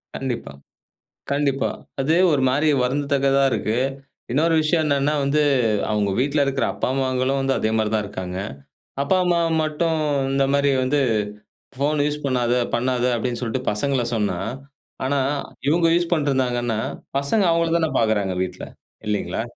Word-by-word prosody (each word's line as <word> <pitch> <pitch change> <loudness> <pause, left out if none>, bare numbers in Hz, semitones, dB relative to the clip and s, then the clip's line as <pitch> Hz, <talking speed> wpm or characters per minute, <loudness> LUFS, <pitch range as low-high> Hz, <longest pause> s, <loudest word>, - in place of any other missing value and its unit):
கண்டிப்பா. 130 - -4 0.8
கண்டிப்பா. 140 -1 +1 0.3
அது 145 +4 +1 0.2
ஒரு 145 -3 +2
மாரி 145 +4 +1 0.2
வருந்தத்தக்கதா 140 +1 +1
இருக்கு. 110 -1 -1 0.5
இன்னொரு 160 +6 +2
விஷயம் 155 +1 +1
என்னன்னா 145 0 +1
வந்து 140 +2 +2 0.5
அவுங்க 105 -2 +1
வீட்ல 140 +3 +1
இருக்கிற 140 -1 0
அப்பா, - - -2
அம்மாங்களும் 130 0 0
வந்து 135 0 +1
அதே 110 - 0
மாரி 110 -1 +1
தான் 110 -1 +1
இருக்காங்க. 95 -2 -6 0.6
அப்பா, 140 +7 +2
அம்மா 175 -1 +2 0.2
மட்டும் 160 +1 0 0.4
இந்த 135 0 +2
மாதிரி 140 0 +3
வந்து 140 +3 +1 0.8
ஃபோன் 145 +2 0
யூஸ் 150 0 -2
பண்ணாத, 125 -3 +1 0.2
பண்ணாத 125 0 0
அப்படீன்னு 120 0 -2
சொல்லிட்டு 125 +2 -3
பசங்கள 130 +4 0
சொன்னா, 105 -2 0 0.7
ஆனா 140 +1 +1 0.5
இவுங்க 165 +3 +3
யூஸ் 175 -1 0
பண்ணிட்டுருந்தாங்கன்னா 130 -7 0 0.4
பசங்க 140 +10 +1
அவுங்கள 165 0 +2
தான 160 -2 +1
பாக்குறாங்க 105 -4 +1
வீட்ல, 95 - -7 0.4
இல்லைங்களா? 105 +1 -1
135 Hz, 140 wpm, -22 LUFS, 120-150 Hz, 0.8 s, மாதிரி